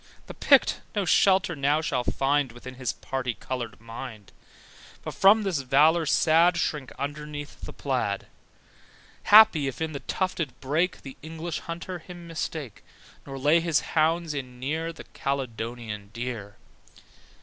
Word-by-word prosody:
The - - -9
Pict - - +4
no 205 -2 0
shelter 190 0 +4
now 145 +1 +2
whall 140 -6 -1
find 135 0 +1
Within 125 +1 -10
his 130 -2 -2
parti 130 -3 -4
coloured 120 -4 -5
mind, 115 -2 -9 0.7
But - - -5
from 210 +3 +5
this 190 -7 0
valour 150 +5 +4
sad 165 +3 +4
Shrink 150 -5 -2
underneath 145 +1 -6
the - - -7
plaid: 125 -8 -2 1.0
Happy, 205 -9 +7
if 135 - -5
in 160 -1 -2
the 140 - -5
tufted 175 -6 -3
brake 160 +7 -1
The 135 -1 -10
English 160 +1 -5
hunter 170 +2 -6
him 175 +1 -11
mistake, 155 -7 -5 0.4
Nor 135 -1 -6
lay 150 +5 +4
his 165 -3 +1
hounds 165 0 +2
in 125 -3 -6
near 160 +5 -2
The 165 - -11
Caledonian 115 -5 -4
deer. 115 -4 -5
145 Hz, 140 wpm, -26 LUFS, 125-165 Hz, 1.0 s, Happy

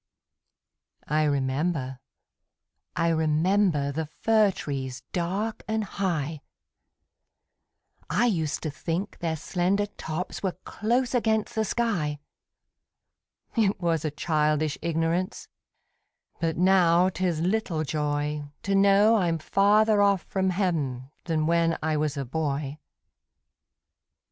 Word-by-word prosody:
I 155 +1 +2
remember, 135 -1 -1 1.0
I 170 - +2
remember, 160 -1 +2
The 160 +2 -3
fir 215 +6 +3
trees 135 -7 -5
dark 195 +6 -2
and 220 0 0
high; 165 -7 -2 1.7
I 240 - +2
used 160 -10 0
to 155 - -2
think 175 +6 -4
their 165 -2 -1
slender 185 +5 0
tops 180 -3 -5
Were 185 -3 -2
close 240 +4 0
against 220 -3 +1
the 220 - +1
sky: 190 -10 -1 1.4
It 210 -5 +2
was 165 -3 0
a 155 - 0
childish 150 0 0
ignorance, 170 +4 -1 0.9
But 165 -2 -1
now 180 -1 +4
'tis 180 -3 -1
little 180 -2 0
joy 150 0 -2 0.2
To 200 - -1
know 200 +3 +5
I'm 170 -4 +1
farther 205 +5 +3
off 200 -2 +3
from 190 -1 -1
Heav'n 150 -9 -1
Than 160 -2 0
when 165 0 +2
I 160 0 +1
was 150 0 -1
a 140 - -2
boy. 145 +1 -3
170 Hz, 110 wpm, -26 LUFS, 150-195 Hz, 1.7 s, know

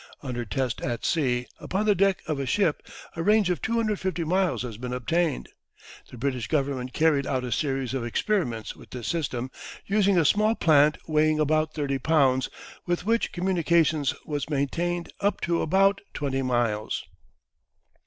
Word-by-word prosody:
Under 125 -3 -4
test 125 +4 -2
at 120 -2 -3
sea, 125 -7 +1
upon 195 +3 -2
the 210 - +5
deck 195 0 +2
of 155 -3 -1
a 135 - -2
ship, 170 +1 +1 0.3
a 165 - -3
range 210 0 +3
of 175 - -2
250 210 -6 -1
miles 180 -2 +1
has 115 -4 -7
been 125 0 -4
obtained. 155 - 0 0.6
The 125 - -11
British 125 -2 -2
Government 135 -3 -1
carried 150 -1 +2
out 130 -2 -1
a 125 - -4
series 135 0 -1
of 130 -3 -2
experiments 120 - -1
with - - -15
this 125 -3 -7
system, 130 -6 -2 0.3
using 200 -1 +3
a 165 - +4
small 215 +7 +3
plant 150 -4 +4
weighing 155 0 +2
about 155 +1 +1
30 140 -3 -1
pounds, 135 -3 +2 0.4
with 175 +1 -1
which 230 +2 +1
communication 170 -4 +2 0.2
was 145 -1 -3
maintained 170 +5 -1
up 200 0 0
to 170 0 0
about 195 +4 +3
20 135 -2 -1
miles. 120 -4 -1
155 Hz, 160 wpm, -26 LUFS, 130-175 Hz, 0.6 s, the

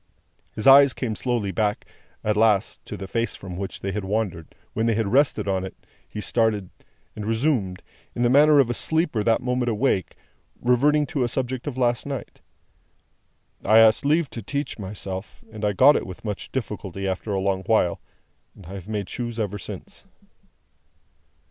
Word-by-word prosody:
His 110 - -5
eyes 140 0 +8
came 115 -4 -3
slowly 115 -4 -1
back, 105 0 -1 0.4
at 105 0 +1
last, 105 -2 +2
to - - -6
the 95 - -7
face 115 +3 -1
from 90 -2 -8
which 95 +1 -6
they 95 - -2
had 105 +1 -3
wandered; 95 -5 -3 0.2
when 110 +1 0
they 115 - +2
rested 110 -1 +2
on 95 -1 0
it, 95 - -7 0.3
he - - -6
started, 105 -4 0 0.4
and 105 - -6
resumed, 110 -5 0 0.3
in 120 - 0
the - - +4
manner 150 +2 +6
of 135 -4 +5
a 120 - -1
sleeper 160 -3 +1
that 115 +3 +2
moment 125 -1 0
awake, 110 -4 0 0.4
reverting 145 +5 +3
to 140 -3 -1
a - - +1
subject 130 +2 -3
of 135 -3 -4
last 120 0 +1
night. 135 -3 -6 1.2
"I 110 +2 +5
asked 110 0 +6
leave 155 +2 +2
to 115 - -6
teach 140 +4 -4
myself, 95 -1 -7
and 110 -1 -9
I 105 - +2
got 135 +8 +6
it - - -1
with 95 +4 -10
much 105 -2 -5
difficulty 100 -6 -4
after 95 +3 -3
a 95 - 0
long 95 0 0
while, 100 -5 +2 0.5
and 95 - -14
I 90 - -9
have 95 -1 -8
made 105 -3 -3
shoes 120 -1 -5
ever 105 -1 -2
since." - - -9
110 Hz, 180 wpm, -24 LUFS, 100-125 Hz, 1.2 s, eyes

